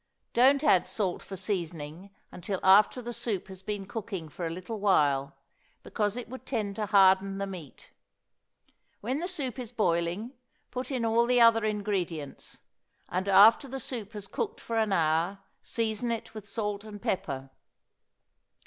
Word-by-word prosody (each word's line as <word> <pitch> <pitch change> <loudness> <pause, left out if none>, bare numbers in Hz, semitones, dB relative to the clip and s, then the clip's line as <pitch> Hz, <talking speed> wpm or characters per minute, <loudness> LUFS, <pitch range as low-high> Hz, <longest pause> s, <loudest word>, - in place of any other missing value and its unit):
Don't 270 +4 +5
add 185 - +4
salt 190 -5 -2
for 195 - -8
seasoning 175 -2 -4 0.2
until 185 +2 -4
after 210 +6 +5
the 240 +1 -5
soup 205 -5 -3
has 190 -1 -9
been 200 0 -4
cooking 195 -6 -5
for 170 +3 -4
a - - -3
little 185 +6 -6
while, 145 -10 +2 0.5
because 210 +1 -1
it 245 - -5
would 255 +1 -9
tend 215 -7 -2
to 210 -1 -1
harden 195 0 +5
the 200 - -2
meat. 180 -8 -10 1.1
When 255 +7 -1
the 350 - -2
soup 275 - -4
is 245 -3 -6
boiling, 180 +2 0 0.4
put 255 0 -4
in 255 -4 -1
all 230 +1 +3
the 250 0 +4
other 230 -1 +6
ingredients; 195 -8 -3 0.5
and 190 +2 -1
after 215 +8 +7
the 270 +1 -5
soup 225 -5 -5
has 205 -2 -7
cooked 440 - -3
for 230 -1 -2
an 215 -2 +1
hour, 165 +2 +2 0.2
season 225 0 -1
it 230 -1 -4
with 210 -2 -9
salt 210 -2 -3
and 210 -1 -9
pepper. 135 -9 -3
205 Hz, 160 wpm, -29 LUFS, 185-230 Hz, 1.1 s, after